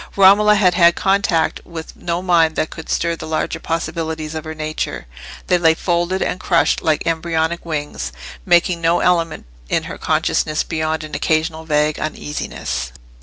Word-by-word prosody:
Romola 205 Hz, +2 st, +6 dB
had 190 Hz, -4 st, +4 dB
had 170 Hz, -1 st, +5 dB
contact 195 Hz, -4 st, +1 dB
with 165 Hz, -2 st, -9 dB
no 170 Hz, +1 st, -3 dB
mind 165 Hz, -3 st, +3 dB
that 155 Hz, -, -1 dB
could 160 Hz, -, -9 dB
stir 170 Hz, 0 st, 0 dB
the -, -, -8 dB
larger 155 Hz, 0 st, -2 dB
possibilities 160 Hz, -1 st, -3 dB
of 160 Hz, 0 st, -5 dB
her 155 Hz, 0 st, -6 dB
nature; 155 Hz, -, -4 dB, 0.4 s
they 180 Hz, -, +2 dB
lay 160 Hz, -1 st, +4 dB
folded 175 Hz, +2 st, 0 dB
and 180 Hz, -, -2 dB
crushed 170 Hz, -3 st, +2 dB
like 155 Hz, -1 st, 0 dB
embryonic 165 Hz, 0 st, -1 dB
wings, 150 Hz, -, -4 dB, 0.3 s
making 170 Hz, -, +3 dB
no 170 Hz, +1 st, +2 dB
element 170 Hz, -2 st, +1 dB, 0.2 s
in -, -, +1 dB
her -, -, -8 dB
consciousness 155 Hz, 0 st, 0 dB
beyond 155 Hz, 0 st, -2 dB
an 155 Hz, -, -9 dB
occasional 160 Hz, 0 st, 0 dB
vague 150 Hz, -1 st, +1 dB
uneasiness. 150 Hz, -, -4 dB
165 Hz, 160 wpm, -19 LUFS, 155-175 Hz, 0.4 s, Romola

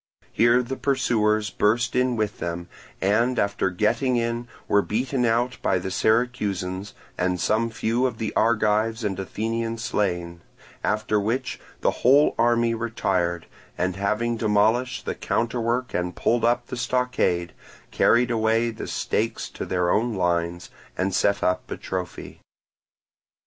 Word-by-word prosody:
Here 120 Hz, +2 st, +4 dB
the 130 Hz, +2 st, -5 dB
pursuers 110 Hz, -6 st, +1 dB
burst 115 Hz, +3 st, +1 dB
in 125 Hz, -1 st, +2 dB
with 110 Hz, -2 st, -2 dB
them, 85 Hz, 0 st, -4 dB, 0.3 s
and 115 Hz, +6 st, +2 dB
after 100 Hz, -1 st, +1 dB
getting 115 Hz, +8 st, +1 dB
in 115 Hz, 0 st, -1 dB, 0.2 s
were 100 Hz, -, +4 dB
beaten 125 Hz, +5 st, -1 dB
out 120 Hz, +2 st, +1 dB
by -, -, +2 dB
the 95 Hz, +1 st, -4 dB
Syracusans, 100 Hz, -4 st, 0 dB, 0.2 s
and 90 Hz, 0 st, 0 dB
some 110 Hz, +5 st, +1 dB
few 115 Hz, +4 st, 0 dB
of 125 Hz, -, -5 dB
the 110 Hz, -2 st, -3 dB
Argives 110 Hz, 0 st, +2 dB
and 95 Hz, -3 st, -2 dB
Athenians 115 Hz, +3 st, -3 dB
slain; 90 Hz, -6 st, -2 dB, 0.4 s
after 105 Hz, 0 st, +1 dB
which 115 Hz, +6 st, -2 dB, 0.2 s
the -, -, +3 dB
whole 140 Hz, +4 st, +5 dB
army 120 Hz, 0 st, +3 dB
retired, 95 Hz, -7 st, -1 dB, 0.3 s
and 90 Hz, 0 st, -1 dB
having 105 Hz, +4 st, 0 dB
demolished 110 Hz, +5 st, +1 dB
the -, -, -1 dB
counterwork 120 Hz, +1 st, -1 dB
and 90 Hz, 0 st, -2 dB
pulled 120 Hz, 0 st, +1 dB
up 120 Hz, +1 st, +2 dB
the 125 Hz, -, -6 dB
stockade, 120 Hz, -8 st, 0 dB, 0.4 s
carried 120 Hz, +1 st, +3 dB
away 115 Hz, +1 st, +2 dB
the 110 Hz, -, -7 dB
stakes 115 Hz, +1 st, -2 dB
to -, -, -6 dB
their 90 Hz, -1 st, +1 dB
own 115 Hz, 0 st, +1 dB
lines, 85 Hz, -1 st, -1 dB, 0.3 s
and 95 Hz, +1 st, 0 dB
set 100 Hz, +2 st, +2 dB
up 90 Hz, -, 0 dB
a -, -, -4 dB
trophy. 90 Hz, -1 st, -6 dB
110 Hz, 140 wpm, -24 LUFS, 95-120 Hz, 0.4 s, whole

